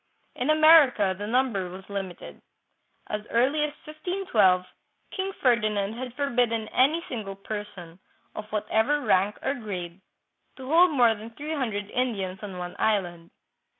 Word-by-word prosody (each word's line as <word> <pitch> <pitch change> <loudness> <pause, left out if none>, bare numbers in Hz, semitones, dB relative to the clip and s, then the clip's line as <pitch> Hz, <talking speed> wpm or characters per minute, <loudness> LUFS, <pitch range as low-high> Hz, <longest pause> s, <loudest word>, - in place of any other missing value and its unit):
In 250 +4 -2
America 310 -10 +6
the 205 +2 -6
number 225 -6 0
was 190 +2 -11
limited. 195 -3 -7 0.6
As 210 - -4
early 260 +6 +2
as 300 -1 -1
1512, 305 - +1 0.5
King 385 0 -3
Ferdi 235 - +2
nand 205 0 -2
had 250 0 -7
forbidden 240 -5 0
any 310 +6 +2
single 210 -5 -5
person, 195 -4 -8 0.3
of 215 0 -8
whatever 220 +7 +1
rank 200 -3 +2
or 270 - +1
grade, 190 -7 -6 0.5
to 260 -1 -10
hold 340 +5 +5
more 245 -7 +4
than 220 +1 -9
three 295 +7 -6
hundred 220 -8 -2
Indians 200 -7 -2
on 195 -3 -7
one 180 0 -6
island. 175 -6 -1
220 Hz, 145 wpm, -26 LUFS, 195-270 Hz, 0.6 s, America